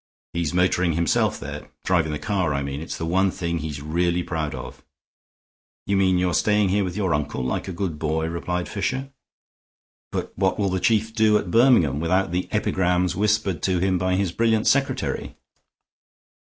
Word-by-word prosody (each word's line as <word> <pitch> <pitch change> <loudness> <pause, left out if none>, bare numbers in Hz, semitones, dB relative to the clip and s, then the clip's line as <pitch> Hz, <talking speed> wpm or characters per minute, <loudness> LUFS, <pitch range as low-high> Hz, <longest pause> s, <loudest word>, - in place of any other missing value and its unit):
He's 85 -3 -1
motoring 90 -1 +2
himself 85 -1 +1
there; - - -7
driving 85 -4 +1
the 75 - -2
car, 95 -5 -1
I 70 - -1
mean. 70 +1 -4
It's 80 - -5
the 80 - -3
one 95 +4 +2
thing 85 -2 -3
he's 75 -2 -5
really 85 +3 0
proud 80 -4 -3
of." - - -9 1.0
"You 100 - 0
mean 95 -1 +3
you're 90 -1 +1
staying 105 +2 +2
here 100 +2 +2
with 90 +1 -4
your 95 -4 +1
uncle, 75 -3 -2
like 65 - -2
a - - -3
good 85 -4 -3
boy?" 80 +1 -1
replied 90 +1 -3
Fisher. 130 +7 -3 1.0
"But - - -4
what 95 0 +1
will 100 -2 +1
the 95 0 -1
Chief 110 +3 +1
do 110 -1 +4
at 90 - -4
Birmingham 115 - +4
without 90 +3 +1
the 90 +1 -2
epigrams 90 -1 +1
whispered 100 -5 +1
to 95 -1 +1
him 95 0 +1
by 90 0 +1
his 95 -2 0
brilliant 110 +2 +1
secretary?" 140 0 0
90 Hz, 180 wpm, -23 LUFS, 80-100 Hz, 1.0 s, do